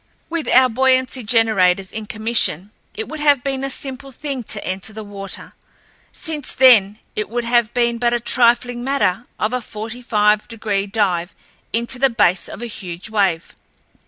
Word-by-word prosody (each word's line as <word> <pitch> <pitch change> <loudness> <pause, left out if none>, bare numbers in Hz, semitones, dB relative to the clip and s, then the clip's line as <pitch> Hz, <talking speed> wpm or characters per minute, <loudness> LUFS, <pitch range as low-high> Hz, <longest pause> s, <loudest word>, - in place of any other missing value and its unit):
With 335 -2 -3
our 255 +1 +6
buoyancy 260 +1 +1
generators 195 -5 +2
in 215 -1 -6
commission 215 -4 +1 0.2
it 220 - -4
would 310 - -6
have 290 -4 +3
been 270 -1 -2
a 275 - -1
simple 270 0 -5
thing 275 0 -5
to - - -4
enter 190 +3 -3
the 220 +1 -7
water, 200 -2 -8 0.6
since 305 -4 -5
then 215 -6 +6 0.2
it 210 - -3
would 240 +1 -2
have 235 -1 +2
been 235 -1 +1
but 240 0 +2
a 240 - +1
trifling 240 0 +2
matter 250 -5 0
of 215 +3 -1
a 250 - -1
forty 220 +2 -7
five 210 -2 +2
degree 210 -3 -2
dive 195 -4 -1 0.4
into 235 +3 -1
the 270 +1 +4
base 200 -6 +1
of - - -8
a - - -2
huge 185 -2 -7
wave. 195 -6 0
230 Hz, 170 wpm, -19 LUFS, 205-255 Hz, 0.6 s, our